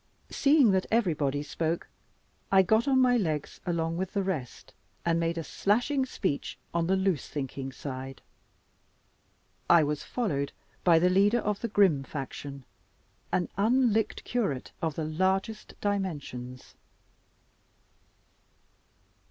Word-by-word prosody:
Seeing 280 -6 +5
that 190 -1 +1
everybody 155 - +1
spoke, 160 +3 -2 0.6
I 190 -1 +6
got 220 +7 +2
on 265 -1 +4
my 250 -1 +5
legs 155 -9 -2
along 165 -1 -1
with 190 +1 -3
the 200 - 0
rest, 155 -11 -4 0.3
and 170 0 +2
made 165 0 0
a 165 - -2
slashing 245 - +1
speech 185 - -3 0.2
on 170 -1 +1
the 190 - +3
loose 190 -6 0
thinking 135 -1 -4
side. 135 0 -7 1.5
I 170 -2 +7
was 150 0 -1
followed 145 - -2 0.3
by 170 -2 +6
the 180 +2 +4
leader 200 +5 +4
of 210 -3 -1
the 235 - -1
grim 195 -9 +3
faction 140 0 -7 0.7
an 180 - 0
unlicked 225 +1 +2
curate 200 - -2
of 160 -3 -1
the 160 - -2
largest 190 +7 -1
dimensions. 145 -11 -4
175 Hz, 125 wpm, -29 LUFS, 150-205 Hz, 1.5 s, I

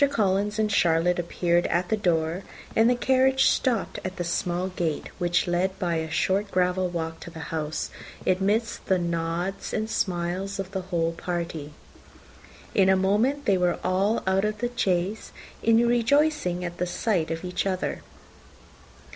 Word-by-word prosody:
Collins 205 -4 +1
and 215 -1 +1
Charlotte 175 -2 +3
appeared 175 0 +1
at 175 +1 0
the 220 - +3
door, 170 -3 0 0.3
and 225 +1 +5
the 250 - +3
carriage 265 +1 +3
stopped 240 -6 +1
at 185 0 -4
the 175 - -3
small 175 +1 -1
gate, 170 -4 -2
which 175 -1 +2
led 180 +2 0
by 175 -2 -1
a 160 0 -3
short 190 +6 +1
gravel 180 0 +1
walk 165 -1 -4
to - - -9
the 160 -1 -8
house, 155 -1 -3 0.3
amidst 205 +5 0
the 190 - +3
nods 170 +2 -2
and 220 0 -2
smiles 185 +2 -1
of 195 -1 -5
the 190 -1 -2
whole 165 -2 +1
party. 165 -3 -4 1.0
In 190 -1 +4
a 190 - +6
moment 215 +10 +1
they 195 -3 +3
were 180 -1 +2
all 195 +4 +1
out 190 +1 +2
of 215 0 -1
the 240 +2 -2
chaise, 190 -1 0 0.3
rejoicing 235 - +3
at 175 0 -6
the 180 - 0
sight 175 -3 0
of 165 +2 -4
each 180 +2 -2
other. 185 -1 -2
185 Hz, 160 wpm, -26 LUFS, 175-210 Hz, 1.0 s, a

